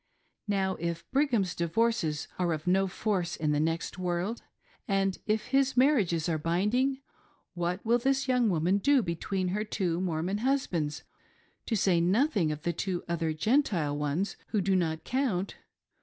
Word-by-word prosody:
Now 195 -2 0
if 170 0 -3
Brigham's 255 - +1
divorces 170 -3 0
are 175 -2 +1
of 155 0 -5
no 190 +2 +3
force 185 -2 -1
in 150 -1 -1
the 145 - +1
next 165 +3 -2
world, 180 +5 -2 0.5
and 195 -1 +1
if 215 +3 0
his 270 -1 +2
marriages 210 - +3
are 160 -2 0
binding, 210 - +1 0.5
what 175 +3 -2
will 235 +2 +3
this 270 +2 +1
young 250 -3 +3
woman 180 +3 +2
do 275 +2 +3
between 180 +2 -2
her 210 +3 -1
two 180 -5 -1
Mormon 180 +3 -1
husbands 190 - -1 0.3
— - - -37
to 225 - 0
say 185 -4 +3
nothing 195 - +2
of 150 0 -6
the 170 - 0
two 180 +1 -3
other 165 -2 -1
Gentile 170 - +1
ones, 150 +7 -2
who 215 - 0
"do 190 0 +1
not 160 -3 0
count!" 235 -8 -1
185 Hz, 160 wpm, -29 LUFS, 170-225 Hz, 0.5 s, no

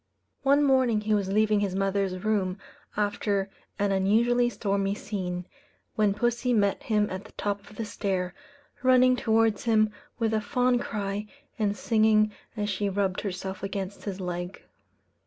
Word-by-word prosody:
One 280 +2 +4
morning 260 -6 +3
he 215 0 0
was 200 -2 +1
leaving 215 0 +3
his 200 -2 -1
mother's 195 -1 0
room 200 -4 0 0.4
after 205 -1 0 0.3
an 200 0 +1
unusually 235 +6 +3
stormy 200 -2 -1
scene, 180 -4 -4 0.5
when 210 -2 +2
pussy 240 +2 +1
met 200 -3 +2
him 210 -2 +1
at 185 +1 -5
the - - -15
top 205 -1 -3
of - - -15
the 225 - -3
stair, 190 -3 -2 0.5
running 255 0 +5
towards 225 -3 +2
him 215 -2 +3 0.3
with 225 -2 0
a 215 - +1
fond 245 +3 +1
cry, 205 -1 -3 0.3
and 205 -1 0
singing 215 0 +3 0.3
as 205 -1 -1
she 205 0 -1
rubbed 195 -1 0
herself 190 -1 -5
against 195 0 -5
his 200 -2 -4
leg. 180 0 -5
205 Hz, 155 wpm, -27 LUFS, 195-220 Hz, 0.5 s, running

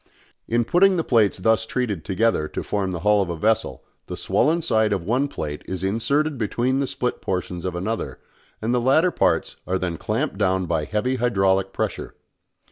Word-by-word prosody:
In 120 0 +1
putting 185 - +4
the 165 - +1
plates 110 -8 +3
thus 110 +4 +2
treated 110 -11 -2
together 95 -2 +1
to - - -5
form 100 -2 -1
the 90 -3 -4
hull 105 +1 +4
of 95 - -2
a 85 - -3
vessel 110 +5 0 0.2
the - - -6
swollen 165 +3 +1
side 110 -8 +2
of 95 -4 -2
one 125 +9 +1
plate 75 - -5
is 95 -1 -4
inserted 140 +8 0
between 120 +5 0
the 140 - 0
split 125 0 -3
portions 90 -1 -3
of 90 -2 -2
another 110 +6 -3 0.4
and 115 +2 0
the 125 - +2
latter 155 +8 +4
parts - - 0
are 95 - +1
then 90 -3 -3
clamped 95 - -2
down 95 -2 +1
by 80 -3 -1
heavy 125 +8 -1
hydraulic 95 -5 +1
pressure. - - -4
105 Hz, 190 wpm, -23 LUFS, 95-125 Hz, 0.4 s, putting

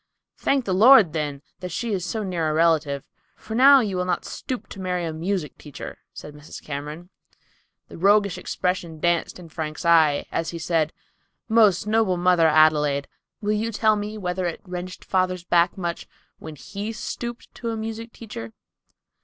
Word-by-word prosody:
"Thank 275 -3 +1
the 190 - 0
Lord, 215 - +7
then, 145 -3 -3 0.2
that 180 -1 -5
she 225 +5 -3
is 185 -3 -2
so 215 +4 -3
near 175 -5 -1
a - - 0
relative! 155 -4 +2 0.3
For 220 - -9
now 270 +3 +7
you 205 -5 -2
will 180 - 0
not 180 - -1
stoop 255 -3 -5
to 195 - -9
marry 180 -2 -1
a 160 - -3
music 165 -2 -3
teacher," 145 -3 -9
said 150 - -10
Mrs. 150 +1 -11
Cameron. 150 +5 -7 0.8
The - - -15
old 170 - -11
roguish 200 -2 +4
expression 180 -4 -3
danced 175 +1 0
in 175 -2 -12
Frank's 155 0 -5
eye, 160 -4 +4
as 165 - -2
he 170 - -5
said, 160 -1 0 0.6
"Most 215 -4 +4
noble 215 -4 +2
mother 175 -2 +4
Adelaide, 150 -2 +3 0.3
will 210 0 0
you 220 +2 -1
tell 215 0 +3
me 210 +1 -4
whether 180 -2 -2
it 170 - -5
wrenched 180 0 -7
father's 185 -1 0
back 175 +1 +2
much 170 -2 -4 0.3
when 160 -1 -9
he 200 +8 -6
stooped 235 +1 -6
to 235 - -5
a 225 - -3
music 225 +1 -5
teacher?" 205 - -9
180 Hz, 180 wpm, -24 LUFS, 160-210 Hz, 0.8 s, Lord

